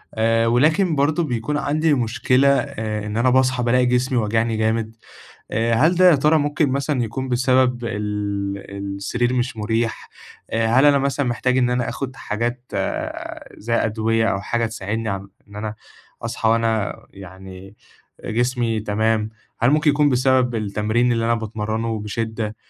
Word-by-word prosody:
آآ، 115 +1 +2
ولكن 155 +9 +3
برضه 150 +4 +1
بيكون 130 +1 -2
عندي 155 +2 +1
مشكلة 125 +2 +2
آآ 110 -7 -1
إن 105 +1 -4
أنا 125 +2 +3
باصحى 130 -1 +2
بالاقي 125 +1 +3
جسمي 125 +1 +1
واجعني 110 0 0
جامد، 110 0 -1 0.6
آآ، 115 +2 +1
هل 155 +10 +4
ده 180 +1 +6
يا - - +5
ترى 150 +3 +3
ممكن 145 +1 +1
مثلًا 140 -1 0
يكون 130 +4 -4
بسبب 125 -1 +2
ال 100 -2 -4
السرير 120 +5 -1
مش 125 -1 -1
مريح، 110 +1 -2 0.4
آآ، 115 0 +1
هل 130 +5 +4
أنا 145 -1 +5
مثلًا 140 0 -1
محتاج 125 +2 0
إن 125 -1 +2
أنا 125 -1 0
آخد 135 -1 -5
حاجات 120 +3 -4 0.9
زي 115 +2 -2
أدوية 110 0 +1
أو 95 - 0
حاجة 115 +3 -1
تساعدني 110 0 -4 0.4
إن 105 - -12
أنا 105 0 -4 0.5
أصحى 110 - -1
وأنا 115 -2 +1
يعني 95 +1 -12 0.5
جسمي 120 -1 0
تمام، 110 +1 0 0.3
هل 120 - +4
ممكن 150 +1 +3
يكون 145 0 +3
بسبب 130 -1 +2
التمرين 110 +3 0
اللي 115 -1 0
أنا 115 +1 +2
باتمرّنُه 110 0 -3
بشِدّة؟ 110 0 -4
115 Hz, 150 wpm, -21 LUFS, 110-130 Hz, 0.9 s, ده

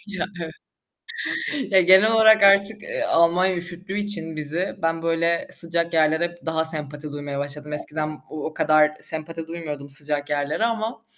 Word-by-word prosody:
Ya, 200 -3 -4 1.2
evet. 275 -7 -4
Ya, 190 - +7
genel 190 +5 +6
olarak 220 -1 +6
artık, 200 +2 +5
eee, - - -4
Almanya 175 +2 +3
üşüttüğü 180 +3 -4
için 170 -6 -1
bizi, 155 +5 -2
ben 165 0 -1
böyle, 170 0 0
sıcak 170 0 -1
yerlere 160 +1 +3
hep 175 0 -7
daha 160 0 0
sempati 150 -2 -3
duymaya 145 -1 -5
başladım. 145 +1 -4
Eskiden 155 0 -2
o 155 -2 -6
o 155 - -5
kadar 155 0 +3
sempati 160 +1 -4
duymuyordum 150 -4 -7
sıcak 145 +1 -3
yerlere 145 +7 -1
ama 225 0 -2
165 Hz, 155 wpm, -23 LUFS, 150-185 Hz, 1.2 s, Ya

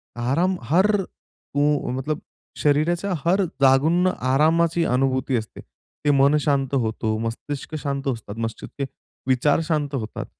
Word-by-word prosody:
आराम, 140 +11 +1
हर 180 - +3
को 145 -4 -3
मतलब 135 +4 -2 0.4
शरीराच्या 170 +6 +1
हर 190 +3 +3 0.2
जागून 140 +6 +4
ना 185 - +3 0.2
आरामाची 165 +3 +3
अनुभूती 130 0 +1
असते. 110 -1 -6
ते 145 - -4
मन 140 +2 +4
शांत 140 -2 0
होतो, 110 -3 -1
मस्तिष्क 130 +7 -5
शांत 140 -1 -3
असतात, 110 -2 -8
मस्तिषके 115 +4 -4 0.4
विचार 130 +4 +3
शांत 150 -3 -1
होतात. 110 -4 -4
140 Hz, 125 wpm, -23 LUFS, 130-160 Hz, 0.4 s, जागून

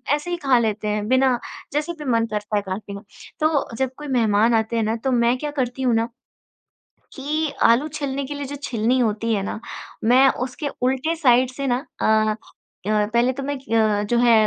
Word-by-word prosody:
ऐसे 300 +4 -6
ही 350 - -1
खा 255 -3 +5
लेते 215 -2 -1
हैं 210 0 -1
बिना 260 -1 +3 0.3
जैसे 300 +4 -1
भी 300 - -6
मन 230 -1 +2
करता 210 0 -3
है 205 - +2
काटने 200 +1 -6
का। 200 - -8 0.4
तो 305 -6 0
जब 260 -1 -1
कोई 295 - -8
मेहमान 230 -3 +3
आते 225 +1 +1
हैं 225 - +1
ना 220 +1 0
तो 265 - +1
मैं 240 0 +3
क्या 295 +3 -4
करती 260 -2 -2
हूँ 245 -3 +2
ना 230 +1 +1 1.1
कि 300 +2 -1
आलू 235 +6 +4
छीलने 280 -2 -3
के 285 - -5
लिए 285 -1 -5
जो 285 - -6
छिलनी 235 +2 +1
होती 225 0 0
है 200 - 0
ना, 200 - -4 0.4
मैं 255 +4 +6 0.2
उसके 265 +3 -5 0.2
उलटे 265 +6 0
साइड 255 -5 +4
से 275 +2 -4
ना, 245 -1 +2 0.2
अ 215 0 +3 0.5
अ, 210 -1 +2
पहले 240 +2 +3
तो 275 - -5
मैं 285 +1 -2
ग 215 -2 +2
जो 240 - +2
है 240 -1 +5
245 Hz, 205 wpm, -22 LUFS, 220-275 Hz, 1.1 s, मैं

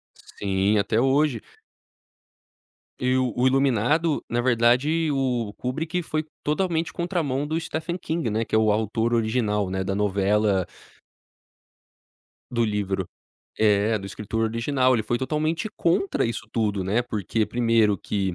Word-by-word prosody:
Sim, 100 +1 -1
até 110 +2 +1
hoje. 135 -2 +2 1.6
E 125 0 +2
o 130 -2 +1
o 125 +1 +2
Iluminado, 135 +4 +2
na 120 +1 0
verdade, 130 +7 +2
o 125 -6 -1
Kubrick 160 +7 -2
foi 155 -1 -2 0.2
totalmente 165 +1 0
contramão 160 -6 -1
do 160 +2 -1
Stephen 160 +1 -4
King, 165 -6 -2
né, 110 +2 0
que - - -5
é - - +5
o 110 -1 +3
autor 110 +2 0
original, 110 -4 0
né, 95 0 -2
da 95 - -2
novela 100 -1 +1 1.8
Do 120 -1 +1
livro. 100 -3 -2 0.5
É, 105 +1 +3
do 100 - -8
escritor 105 +3 -3
original, 130 +3 +1
ele 115 - +1
foi 120 +3 -1
totalmente 155 +8 -1
contra 265 - +1
isso 115 - -3
tudo, 105 -4 0
né. 105 +6 +1
Porque 110 -2 -1
primeiro 115 -3 +2
que, 95 -2 -2
120 Hz, 135 wpm, -24 LUFS, 105-145 Hz, 1.8 s, é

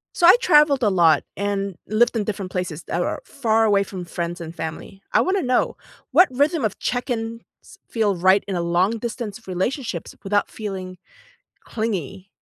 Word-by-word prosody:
So 345 - +5
I 365 - +10
traveled 295 - +4
a 210 - +3
lot, 170 -4 +4
and 200 -1 -2
lived 230 +3 +2
in 220 - 0
different 195 -3 -4
places 180 -3 -4
that 175 - -2
are - - -2
far 225 -4 +1
away 205 -2 +3
from 190 -2 -5
friends 170 +1 -4
and 165 -1 -7
family. 160 +4 -7
I - - +4
wanna 380 +1 +1
know; 250 -4 +1 0.4
what 365 - +6
rhythm 290 +4 +1
of 215 - -1
check-ins 230 -2 -3 0.5
feel 215 -4 +1
right 190 +3 +4
in 195 - -2
a 175 - 0
long 180 +6 +1
distance 230 -1 -6
relationships 190 - -3
without 205 +1 0
feeling 185 -4 -6 0.7
clingy? 195 - -4
205 Hz, 170 wpm, -22 LUFS, 185-235 Hz, 0.7 s, I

